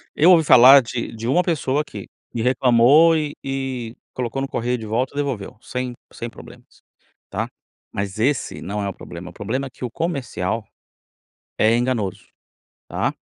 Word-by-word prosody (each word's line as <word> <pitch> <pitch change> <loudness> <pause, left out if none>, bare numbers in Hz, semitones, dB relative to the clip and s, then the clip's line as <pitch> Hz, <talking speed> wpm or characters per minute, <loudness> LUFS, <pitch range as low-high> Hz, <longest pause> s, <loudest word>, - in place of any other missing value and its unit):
Eu 165 +5 +6
ouvi 165 -3 +6
falar 135 0 +9
de 120 -1 -4
de 115 +1 -5
uma 175 +8 +3
pessoa 150 -4 0
que - - -9 0.2
que 115 - -3
reclamou 130 +6 +5
e 150 -2 -2
e 130 -4 -4 0.2
colocou 125 +1 -3
no 135 - -2
correio 125 -1 -1
de 110 - -7
volta 125 +6 -1
devolveu, 135 -10 -3
sem 125 0 -4 0.2
sem 120 - -6
problemas, - - -15 0.5
tá. - - -2 0.4
Mas 100 +1 -4
esse 135 +4 0
não 105 +2 -3
é 100 - -2
o - - -5
problema, 90 +1 -9
o - - -14
problema 115 +9 -3
é - - -10
que 130 - -13
o - - -4
comercial 125 - -2 1.0
é 110 +2 +4
enganoso, 110 -6 -1 0.6
tá. - - -1
125 Hz, 165 wpm, -21 LUFS, 115-135 Hz, 1.0 s, falar